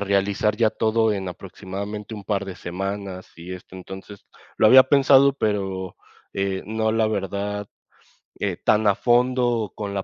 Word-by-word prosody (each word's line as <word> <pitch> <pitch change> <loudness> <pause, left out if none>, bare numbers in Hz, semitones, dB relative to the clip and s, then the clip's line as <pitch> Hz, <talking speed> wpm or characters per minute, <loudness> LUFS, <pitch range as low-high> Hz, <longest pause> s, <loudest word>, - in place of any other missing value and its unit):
realizar 100 +1 +1
ya 115 -1 +3
todo 110 0 +1
en 95 -2 -4
aproximadamente 100 +4 -7
un 105 -2 -9
par 100 -2 -1
de 95 -2 -7
semanas, 95 +1 -5
y 90 +2 -7
esto 90 0 -13
entonces 95 +2 -10 0.3
lo 110 - +6
había 130 +3 +9
pensado, 140 0 +5
pero, 95 -6 -2 0.4
eh, 95 -1 -1
no 110 0 0
la 110 -1 +2
verdad, 100 0 -3 0.7
eh, - - -1
tan 110 0 +2
a 100 - +5
fondo, 125 +1 +2
o 110 -4 -2
con 100 -1 -5
la 95 - -2
100 Hz, 160 wpm, -23 LUFS, 95-110 Hz, 0.7 s, había